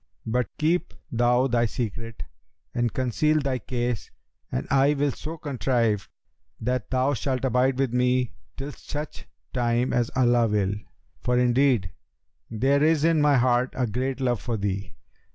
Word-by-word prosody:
But 120 0 0
keep 165 +2 0 0.2
thou 120 +2 +3
thy 120 -2 +2
secret 115 0 -5 0.5
and 120 -1 0
conceal 150 +5 +1
thy 135 -3 -1
case 120 -4 -3 0.4
and - - -2
I 140 +2 +4
will 145 0 +1
so 160 +5 -7
contrive 120 -7 0 0.5
that 125 0 -2
thou 130 +2 +2
shalt 130 +1 -1
abide 130 +1 +2
with 135 -3 0
me 125 0 +2 0.2
till 140 +2 -5
such 150 +1 -7 0.3
time 120 0 +1
as 120 -1 +1
Allah 120 -2 +4
will;[FN#289] 105 -1 -1 0.4
for, 125 0 +1
indeed, 125 -6 +3 0.6
there 135 +6 +2
is 155 -1 +3
in 165 -2 +4
my 145 -2 +5
heart 125 0 +3
a 130 - +2
great 130 +4 -2
love 120 -6 0
for 115 +4 -2
thee. 100 -2 -3
125 Hz, 150 wpm, -25 LUFS, 120-135 Hz, 0.6 s, my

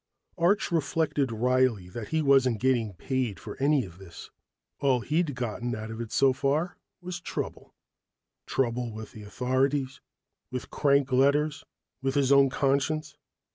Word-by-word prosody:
Arch 185 +5 +2
reflected 150 -4 0
wryly 125 -4 +1
that 105 +4 -7
he 160 +5 0
wasn't 135 -5 +4
getting 120 -4 +1
paid 120 -2 -2
for - - -8
any 140 -1 +2
of 90 -1 -13
this. 90 -4 -11 0.5
All 130 -3 +2
he'd 155 +1 0
gotten 120 0 -3
out 110 +1 -6
of 110 +1 -5
it 115 - -6
so 135 -1 +4
far 145 +6 0 0.3
was 175 0 -6
trouble. - - -6 0.7
Trouble 120 -2 -1
with 110 0 -8
the 110 - -11
authorities, 130 +5 -1 0.5
with 125 -1 -6
crank 140 -2 +2
letters, 145 +3 +2 0.4
with 135 +1 -1
his 140 -1 +2
own 140 -1 +6
conscience. 140 +3 0
130 Hz, 145 wpm, -28 LUFS, 120-145 Hz, 0.7 s, own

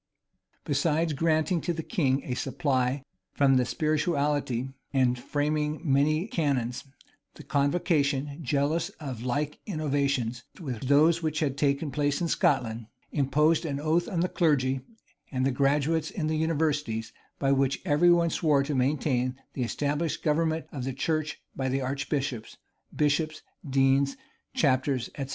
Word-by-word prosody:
Besides 160 -1 +1
granting 160 +3 +1
to 175 - -1
the 160 -1 -4
king 140 - 0
a 125 - -3
supply 130 0 0 0.3
from 135 -2 +4
the 125 - +2
spirituality, 145 -2 0 0.2
and 130 -3 +3
framing 150 +3 -1
many 155 +3 +2
canons, 140 - -1 0.5
the - - -11
convocation, 145 -1 0
jealous 150 +5 0
of 135 -7 -6
like 145 +4 -2
innovations 140 - -1 0.2
with 130 -7 -5
those 155 +4 +5
which 155 -1 -1
had 140 -4 0
taken 140 +1 0
place 145 +1 0
in 175 - 0
Scotland, 115 -8 +1 0.2
imposed 150 +3 +2
an 145 -4 -3
oath 160 +3 +1
on 170 -3 -1
the 180 - +2
clergy 135 -7 +1 0.5
and 130 -2 0
the 135 - +2
graduates 145 +4 +1
in 165 - -3
the 155 0 0
universities, 150 -8 -1 0.2
by 135 -1 +1
which 135 0 +2
every 165 +1 +4
one 170 -1 +4
swore 145 -4 +2
to 145 +2 -3
maintain 130 -1 +1 0.2
the 130 - -4
established 145 +6 -1
government 160 +1 +1
of 135 -4 -5
the 135 +1 -3
church 155 +2 -2
by 130 0 -1
archbishops, 135 -2 -3 0.4
bishops, 155 +1 0 0.3
deans, 135 +1 +3 0.4
chapters, 130 -3 +1
etc. 135 -2 -5
145 Hz, 140 wpm, -28 LUFS, 135-155 Hz, 0.5 s, those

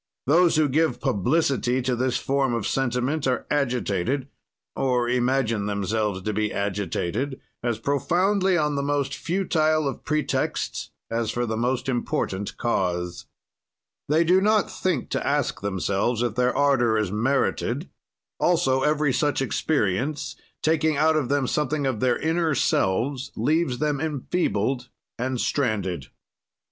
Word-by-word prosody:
"Those 170 +4 +4
who 155 -1 +4
give 155 +4 +1
publicity 130 - +1
to 125 0 0
this 125 +1 0
form 135 -3 0
of 115 - -2
sentiment 135 +3 0
are 125 - 0
agitated 125 -2 0 0.5
(or 125 -2 +1
imagine 120 -4 +1
themselves 100 -1 -1
to 105 - -1
be 105 0 0
agitated) 100 - -2 0.2
as 120 -2 -1
profoundly 180 - +1
on 150 -2 +1
the 140 - 0
most 140 -1 -1
futile 155 -4 +1
of 135 - -5
pretexts 155 -1 -1 0.2
as 115 -1 -1
for 120 +2 -1
the 110 -1 -2
most 125 +3 -1
important 105 -5 -2
cause. 90 -6 -1 0.8
"They 155 +3 +4
do 180 +3 +4
not 215 +1 +2
think 175 -9 -2
to - - -1
ask - - 0
themselves 100 +4 0
if 120 -3 0
their 125 +2 +1
ardor 130 -6 +3
is 105 -4 0
merited; 125 +6 0 0.5
also 135 -7 +2
every 150 -1 +2
such 145 +3 +1
experience, 135 0 -1 0.3
taking 155 -1 +2
out 155 +2 +4
of 145 -5 0
them 140 -1 +2
something 150 +2 0
of 130 -5 -1
their 125 0 +2
inner 160 -1 +1
selves, 130 +6 0
leaves 155 -5 +1
them 150 -1 0
enfeebled 135 - -1 0.3
and 130 0 -1
stranded. 100 - -1
130 Hz, 135 wpm, -25 LUFS, 115-150 Hz, 0.8 s, Those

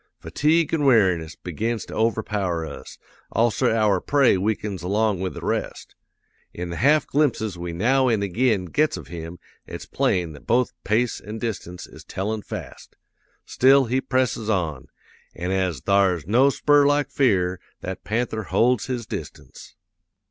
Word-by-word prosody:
Fatigue 160 +1 +1
an' 155 -3 +1
weariness 95 - +3
begins 110 +6 -3
to - - -10
overpower 105 -6 -1
us; - - -10 0.3
also 115 -1 +2
our 110 -3 +2
prey 140 -6 +3
weakens 100 -1 -2
along 100 +2 0
with 95 -1 -3
the - - -7
rest. - - -3 0.6
In 85 0 -5
the 85 - -5
half 150 +4 +3
glimpses 125 -9 0
we 85 0 -5
now 130 +9 +2
an' 110 -4 +1
ag'in 105 0 +1
gets 150 - 0
of - - -10
him 85 0 -7 0.3
it's - - -8
plain 85 -3 0
that 75 - -15
both 125 +1 +2
pace 115 +4 0
an' 105 +3 -8
distance 95 -6 -5
is - - -14
tellin' 105 +3 -3
fast. - - -9 0.5
Still, 135 +1 +4
he 130 +3 0
presses 125 -5 -1
on; 85 -10 -1 0.5
an' 90 +2 -3
as 95 -4 -1
thar's 95 -5 +2
no 125 - +4
spur 145 +1 +3
like 145 0 +1
fear, 95 -9 +1 0.2
that 95 +1 -6
panther 110 -1 -2
holds 115 +5 +2
his 125 -3 -3
distance. - - -9
110 Hz, 155 wpm, -23 LUFS, 90-125 Hz, 0.6 s, Still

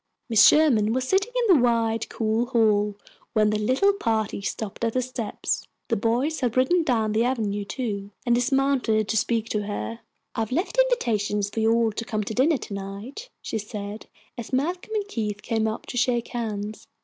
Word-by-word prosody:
Mrs. 210 -2 +8
Sherman 235 -9 +4
was 255 +1 -1
sitting 390 - +1
in 400 - +6
the 275 - +4
wide, 230 -2 +1
cool 225 +2 0
hall 210 -4 +2 0.4
when 215 -2 +3
the 215 - 0
little 260 - +3
party 220 - -1
stopped 205 +2 -5
at 230 -1 +1
the 255 - +1
steps. 245 -3 -3 0.2
The 230 - +2
boys 240 +9 0
had 245 -2 -1
ridden 300 +8 +4
down 230 -8 +1
the 220 +2 +2
avenue, 215 -5 -1
too, 200 -4 -4 0.2
and 240 - +3
dismounted 245 -4 +2
to - - -1
speak 225 +1 +1
to 210 - 0
her. 230 +2 -4 0.3
"I - - -4
have 225 0 -2
left 365 - -1
invitations 210 - +1
for - - -3
you 220 0 +3
all 230 -1 +3
to 220 - -4
come 215 -2 -2
to 215 - -5
dinner 280 +6 +3
to 215 - -8
night," 200 - -7
she 220 - -3
said, 210 0 -7 0.3
as 230 - -7
Malcolm 350 +11 -1
and 410 -1 -1
Keith 210 - -3
came 225 -1 0
up 220 +1 -4
to 245 - -6
shake 240 -1 +1
hands. 215 -3 -4
230 Hz, 195 wpm, -25 LUFS, 215-260 Hz, 0.4 s, Mrs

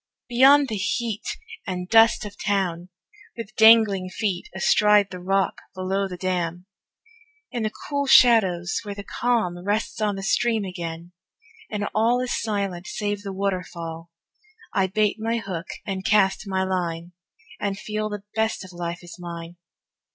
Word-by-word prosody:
Beyond 270 +3 +6
the 220 -4 -3
heat 215 +2 -2 0.4
And 180 -1 -3
dust 225 +1 +5
of 205 -1 -8
town, 185 -4 -1 0.5
with 220 -2 -7
dangling 220 -4 +6
feet 185 -1 -3
Astride 205 +1 +4
the 180 - -7
rock 195 +1 0
below 190 +1 -1
the 180 -1 -7
dam, 180 -1 -2 0.9
In 240 - -3
the 215 -1 -1 0.2
cool 280 -1 -1
shadows 190 -10 +5
where 205 -1 -6
the 200 - -7
calm 210 -8 -1
Rests 210 +2 -1
on 210 -2 +1
the 195 - -6
stream 225 +1 +1
again, 170 -2 -6 0.6
and 205 -1 -2
all 230 +3 +3
Is 255 -1 -2
silent 200 -5 -2
save 205 -1 -3
the 200 -1 -6
waterfall, 175 -4 -4 0.6
I 190 -1 +2
bait 210 +3 +1
my 225 +1 -1
hook 190 -6 -5 0.2
and 190 -3 -4
cast 200 -1 +2
my 190 -1 0
line, 175 -2 -2 0.5
And 200 -1 -2
feel 215 +1 -3
the 205 -1 -6
best 220 -2 0
of 185 - -12
life 175 0 -5
is 175 +5 -11
mine. 170 0 -8
195 Hz, 150 wpm, -24 LUFS, 180-215 Hz, 0.9 s, Beyond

